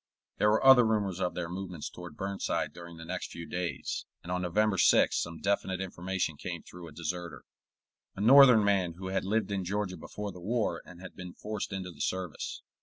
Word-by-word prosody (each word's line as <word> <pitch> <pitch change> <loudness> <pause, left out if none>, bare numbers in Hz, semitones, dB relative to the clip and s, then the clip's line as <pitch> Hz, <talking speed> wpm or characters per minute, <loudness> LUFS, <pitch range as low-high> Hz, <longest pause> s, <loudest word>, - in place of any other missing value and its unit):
There 105 - +5
were 110 +5 +2
other 135 -2 +9
rumors 105 -5 0
of 90 - -1
their 90 -2 -2
movements 90 -2 -5
toward 90 -1 -10
Burnside 100 0 -2
during 85 -1 -10
the 80 - -9
next 90 +2 -4
few 85 - -7
days, 90 0 -3 0.2
and 85 - -6
on 90 0 0
November 95 +3 +1
6th - - +5
some 85 0 -2
definite 100 -1 0
information 90 -3 -2
came 85 +1 -5
through 90 -1 -11
a - - -11
deserter, 85 +1 -5 0.7
a 95 - -5
Northern 125 -1 +8
man 95 -4 +2
who 95 +2 -6
had 95 0 0
lived 105 0 0
in 100 -2 -1
Georgia 95 0 -2
before 105 +5 -6
the 90 - -11
war 105 -4 -1
and 90 -1 -12
had 95 - -10
been 90 -2 -8
forced 105 -1 -4
into 95 -2 -4
the - - -10
service. 95 -4 -3
95 Hz, 200 wpm, -30 LUFS, 85-100 Hz, 0.7 s, other